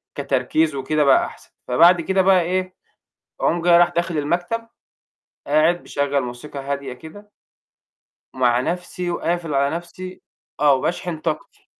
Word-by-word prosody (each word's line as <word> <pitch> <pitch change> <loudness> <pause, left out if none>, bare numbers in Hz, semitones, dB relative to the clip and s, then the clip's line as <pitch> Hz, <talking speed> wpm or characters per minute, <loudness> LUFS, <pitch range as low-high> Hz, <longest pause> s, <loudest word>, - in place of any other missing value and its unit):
كتركيز 140 +2 0
وكده 150 +3 0
بقى 140 - +4
أحسَن. - - -13 0.2
فبعد 170 +7 +5
كده 190 +3 +1
بقى 190 -1 +4
إيه، 185 +2 -2 0.7
أقوم 170 - +1
جاي 170 0 +6
رايح 175 - +5
داخل 170 -2 -2
المكتب، 175 +10 -2 0.8
قاعد 155 +4 +2
مِشَغّل 140 0 -1
موسيقى 125 +4 -7
هادية 140 -1 -4
كده 205 +11 -12 1.0
ومع 125 -2 +2
نَفْسي 180 +4 -3
وقافل 170 -2 -2
على 140 +3 +1
نَفْسي 185 +2 -9 0.4
آه 145 -1 +5
وباشحن 170 +4 -2
طاقتي. 155 0 -5
165 Hz, 130 wpm, -21 LUFS, 140-175 Hz, 1.0 s, جاي